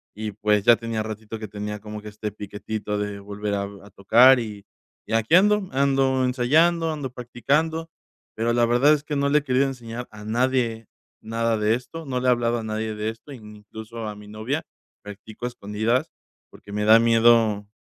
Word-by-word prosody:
y 105 0 -4
pues, 105 -1 +1
ya 120 - +8
tenía 115 -1 -3
ratito 110 0 -7
que 110 - -6
tenía 105 0 -5
como 105 0 -8
que 105 - -8
este 105 0 -6
piquetito 105 0 -5
de 105 -1 -3
volver 100 +1 -5
a 100 - -1 0.2
a 100 - -14
tocar 120 +6 +6
y 105 -3 -8 0.4
y 110 - -5
aquí 115 +9 +3
ando, 205 0 +4
ando 135 -1 +2
ensayando, 160 +7 +2
ando 140 -4 -5
practicando. 150 +7 -1 0.5
Pero 115 +1 0
la 120 0 +3
verdad 120 +5 +4
es 145 -1 -1
que 150 - -3
no 140 0 +1
le 150 - +4
he - - -12
querido 130 +1 +2
enseñar 120 -2 -7
a 105 0 -11
nadie 120 -1 0 0.3
nada 115 0 -1
de 105 +2 +2
esto. 160 +6 -8
No 130 -2 -2
le 130 - -1
he - - +6
hablado 120 -1 +1
a - - -6
nadie 110 0 -3
de 105 +1 -3
esto, 115 +6 -10
ni 105 -3 -12
incluso 110 +2 -9
a 105 - -6
mi 105 0 -13
novia. 110 +9 -3 0.4
Practico 105 +3 -9
a - - -1
escondidas 110 +2 -1 0.4
porque 100 - -14
me 105 0 -1
da 110 +1 +8
miedo 115 -3 +4
115 Hz, 200 wpm, -24 LUFS, 105-130 Hz, 0.5 s, ya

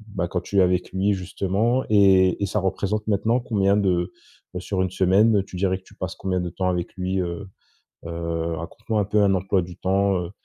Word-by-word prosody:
bah, 90 -2 -1
quand 90 0 -2
tu 100 - -4
es - - +7
avec 90 0 +1
lui, 100 +2 +1
justement 100 +6 0
et 95 -2 +4
et - - +2
ça 105 - -1
représente 100 +2 -2
maintenant 110 +4 +1
combien 100 -4 +1
de, 90 -3 +1 0.4
beh, 90 - -4
sur 95 -1 -2
1 95 - 0
semaine, 95 +3 +3
tu 95 - -11
dirais 95 0 +1
que - - -29
tu - - -19
passes - - -5
combien 95 -1 -2
de 90 - -3
temps 90 +2 -2
avec 90 -1 -2
lui? 95 0 -2
Heu 90 +3 -5 0.6
heu, 85 0 -3
raconte-moi 95 +7 -3
un 100 - +1
peu 105 +1 +2
un 100 -1 +3
emploi 95 0 +1
du 90 0 -9
temps, 100 +1 +1
heu 85 - -7
95 Hz, 220 wpm, -23 LUFS, 90-100 Hz, 0.6 s, es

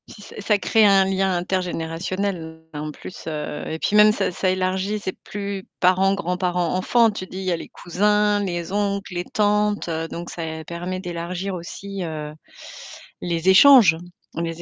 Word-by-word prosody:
Si, 210 - -13
ça - - -12
ça 210 +1 +2
crée 220 +2 +3
un 195 -1 +5
lien 190 -1 +1
intergénérationnel 175 -1 -3
en 150 +1 -5
plus, 175 - -11
heu 150 -1 -4
et 160 - -3
puis 210 - 0
même 210 0 +8
ça 210 - -1
ça 185 +1 0
élargit, 185 +3 -1
c'est 190 -2 -5
plus 200 -1 -5
parents, 185 +2 +4
grands-parents, 180 -1 -1
enfants. 225 +5 +3
Tu 195 -2 -6
te - - -22
dis, 185 - -7
il - - -5
y 185 - 0
a 170 - 0
les - - -9
cousins, 210 +3 +1
les 175 -2 -3
oncles, 200 -1 -1
les 175 0 -2
tantes, 210 -2 +1 0.2
donc 170 +1 -6
ça 160 -1 -5
permet 175 +3 -5
d'élargir 180 +2 -4
aussi, 195 +3 -6
heu, 155 -2 -5 0.9
les 170 +1 0
échanges 200 -4 +8 0.4
les 165 0 -3
185 Hz, 170 wpm, -22 LUFS, 170-200 Hz, 0.9 s, même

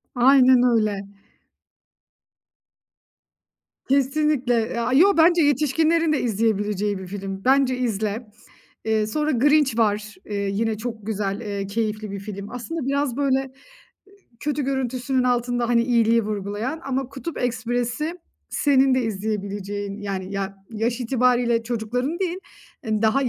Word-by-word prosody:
Aynen 255 0 +6
öyle. 215 -5 +1 2.8
Kesinlikle. 275 -1 +2
E 230 +1 -1
aaa, 235 +2 0
yo, 365 +7 +5
bence 340 +1 +5
yetişkinlerin 310 +3 +2
de 295 - 0
izleyebileceği 210 -2 0
bir 190 -1 -8
film. 195 0 -6
Bence 265 -1 +3
izle. 220 -1 -2 0.6
Eee, 220 -1 +1
sonra 300 +7 0
Grinch 285 -1 +3
var. 210 -1 0
Eee, 205 - -5
yine 220 +2 -1
çok 225 -2 -6
güzel, 205 -2 -2
eee, 200 -2 -4
keyifli 215 0 -2
bir 200 - -5
film. 200 0 -7
Aslında 260 +4 -5
biraz, 280 -2 0
böyle, 270 -2 +2
ııı, 270 -1 -6 0.9
kötü 295 -1 -1
görüntüsünün 260 -1 -1
altında, 245 -1 0
hani, 235 -1 +3
iyiliği 230 -1 +3
vurgulayan 210 +8 -3
ama 265 -1 -2
Kutup 285 +5 -6
Ekspresi 245 +6 -2 0.3
senin 270 -2 +3
de 255 - +1
izleyebileceğin, 205 -1 -4
yani 195 -2 -4
ya 195 0 -3
yaş 230 +3 -2
itibariyle 245 -1 +2
çocukların 245 +7 -2
değil 365 -1 -2 0.5
daha, 220 +3 +2
ııı, 260 - +1
235 Hz, 130 wpm, -23 LUFS, 210-270 Hz, 2.8 s, Aynen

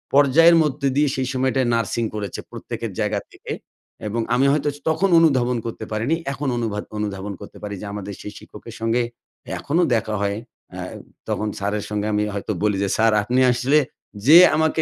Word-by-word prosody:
পর্যায়ের 150 +5 +6
মধ্যে 140 -2 -1
দিয়ে 150 0 +4
সেই 130 -1 -1
সময়টায় 130 0 +1
নার্সিং 115 0 0
করেছে 100 -3 -4
প্রত্যেকের - - -5
জায়গার - - 0
থেকে - - -9 0.6
এবং 115 +3 -1
আমি 130 +2 +3
হয়তো 150 0 +1
স - - -12
তখন 160 +5 +2
অনুধাবন 130 -6 +3
করতে 115 -1 -5
পারিনি 115 +9 0 0.2
এখন 140 +2 -4
অনুবাধ 110 -3 -2
অনুধাবন 100 -1 -3
করতে - - -11
পারি 100 -1 -4
যে, - - -6
আমাদের 100 -1 -5
সেই 105 - -7
শিক্ষকের - - -12
সঙ্গে 115 +2 +1 0.6
এখনও 165 +5 +1
দেখা 110 -1 -1
হয়। 100 0 0 0.4
আ - - -6 0.5
তখন 105 - -1
স্যারের 100 +1 -2
সঙ্গে 105 0 -2
আমি 105 0 +2
হয়তো 100 +2 -3
বলি 105 -2 +2
যে, 100 - 0
"স্যার 110 0 +4
আপনি 125 +4 +1
আসলে 130 +5 +3 0.5
যে 155 +3 +10 0.2
আমাকে 160 0 +2
115 Hz, 180 wpm, -22 LUFS, 105-140 Hz, 0.6 s, যে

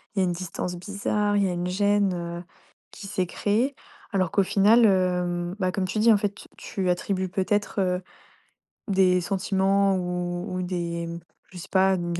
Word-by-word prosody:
il - - 0
y - - +4
a - - +3
une 175 - 0
distance 180 0 -4
bizarre, 205 +2 -1
il 200 - +3
y 190 - +1
a - - -2
une 175 0 -2
gêne, 200 +1 +2
heu, 170 0 -5 0.5
qui 200 - -9
s'est 190 -2 -1
créée». 225 +10 0 0.4
Alors 185 -3 +1
qu'au 200 - +3
final, 210 +5 +4
hem, 180 -2 +1
bah, 185 -2 +1
comme 190 0 -1
tu 210 +3 -2
dis, 230 +1 +6
en 210 - +6
fait, 205 -1 -1
tu - - -13
tu 190 -2 -3
attribues 185 +1 -1
peut-être, 200 +3 -1
heu, 180 -1 +1 0.9
des 185 -2 +3
sentiments 195 +1 +1
ou 180 +1 -3
ou 185 - -2
des 170 -2 -3
m 170 0 -5 0.3
je 185 - -11
sais - - -9
pas, 190 0 +4
une 175 -1 -3
185 Hz, 195 wpm, -25 LUFS, 180-200 Hz, 0.9 s, dis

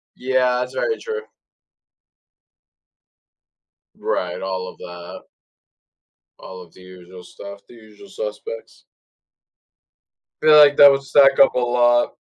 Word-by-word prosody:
Yeah, 125 -1 -1
that's 125 +1 -5
very 450 - -2
true. 455 -1 -7 2.7
Right, 470 +3 -4
all 95 -1 -5
of - - -16
that. 85 0 -11 1.2
All 95 -1 -12
of 85 -2 -17
the 95 - -19
usual 90 0 -15
stuff 100 +2 -13
the - - -19
usual 110 - -18
suspects. - - -9 1.6
Feel 155 0 +5
like 145 -1 +5
that 145 -1 +8
would 135 0 -2
stack 135 0 +3
up 135 - +4
a 125 - 0
lot. 120 0 0
125 Hz, 115 wpm, -19 LUFS, 95-145 Hz, 2.7 s, that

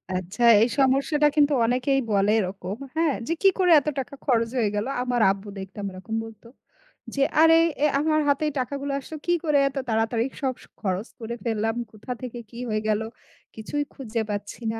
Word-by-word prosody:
আচ্ছা, 185 +6 -3 0.2
এই 230 - +4
সমস্যাটা 275 +3 +3
কিন্তু 295 -1 +4
অনেকেই 255 +3 +1
বলে 200 0 +3
এরকম। 190 0 -4 0.2
হ্যাঁ? 320 -2 +2
যে, 330 - +1
কি 390 - +7
করে, 360 -2 +4
এত 285 - -11
টাকা 275 +2 -5
খরচ 230 -3 +2
হয়ে 225 -4 +2
গেল। 205 +1 -1 0.2
আমার 245 -2 0
আব্বু 195 +1 -6
দেখতাম 195 +1 -7
এরকম 185 +4 -6
বলত। 225 -2 -12 0.7
যে, 280 - 0 0.2
আরে 325 0 +7 0.3
এ - - +6
আমার 310 +1 +2
হাতে 285 +2 +2 0.2
টাকাগুলো 280 +2 -3
আসলো, 310 +3 -8
কি 345 - +1
করে 300 -3 +2
এত 275 - -10
তাড়াতাড়ি 225 +1 +1 0.2
সব 265 -2 0
স - - -15 0.2
খরচ 195 +2 -2
করে 235 0 -5
ফেললাম, 225 -1 -1 0.2
কোথা 215 +4 -9
থেকে 245 -1 -6
কি 235 - -12
হয়ে 215 0 0
গেল। 215 0 +1 0.5
কিছুই 255 +7 -3
খুঁজে 230 -4 -3
পাচ্ছি 205 +2 -5
না। 225 - -5
235 Hz, 185 wpm, -25 LUFS, 215-280 Hz, 0.7 s, কি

